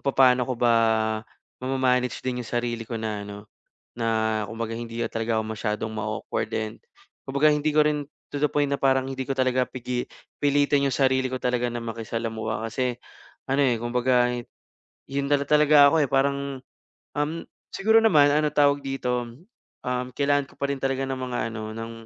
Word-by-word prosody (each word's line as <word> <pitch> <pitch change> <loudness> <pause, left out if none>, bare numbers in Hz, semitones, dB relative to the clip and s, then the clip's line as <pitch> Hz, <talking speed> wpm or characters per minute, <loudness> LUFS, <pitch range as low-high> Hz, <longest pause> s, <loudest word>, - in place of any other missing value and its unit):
kung - - -36
papaano 130 -2 +4
ko 125 - -1
ba 120 -1 +3 0.9
ma-ma-manage 130 -1 0
din 125 -1 -2
'yong 120 - -7
sarili 120 -1 -2
ko 115 - -3
na 110 -2 -3
ano, 100 0 -8 0.6
na 110 -2 0
kumbaga 115 +1 -4
hindi 115 0 -6
talaga 115 0 -1
ako - - -4
masyadong 105 +1 -2
ma-awkward 110 -1 -3
din. 110 -1 -3 0.5
Kumbaga 140 +3 +3
hindi 150 0 +2
ko 155 - +4
rin 150 -1 0 0.2
to 145 - -6
the 150 +1 +2
point 145 -1 +1
na 140 - 0
parang 135 -1 +2
hindi 130 -1 -4
ko 135 - -2
talaga 130 -1 +2
pigi 125 -1 -4 0.3
pilitin 145 0 +2
'yong 135 - -2
sarili 130 -1 +2
ko 130 - -3
talaga 125 -1 0
na 120 - -3
makisalamuha 115 -1 -4
kasi 125 +2 -1 0.6
ano 135 +2 +2
eh, 125 -3 +3
kumbaga 125 +1 +2 0.8
yun 140 +1 -2
talaga 145 0 +6
ako 155 0 +3
eh 135 - -2
parang, 140 0 0 0.5
um, 145 +2 0 0.4
siguro 220 +3 +4
naman 150 -10 +5
anong 150 -1 +1
tawag 145 -1 +4
dito, 125 -3 -2 0.6
um, 125 0 -1
kailangan 145 -1 +1
ko - - -21
pa 140 - -1
rin 135 - -7
talaga 135 0 0
ng 135 -1 -3
mga 125 -1 -3 0.2
ano, 110 -1 -5
ng 115 0 -5
130 Hz, 175 wpm, -25 LUFS, 115-140 Hz, 0.9 s, talaga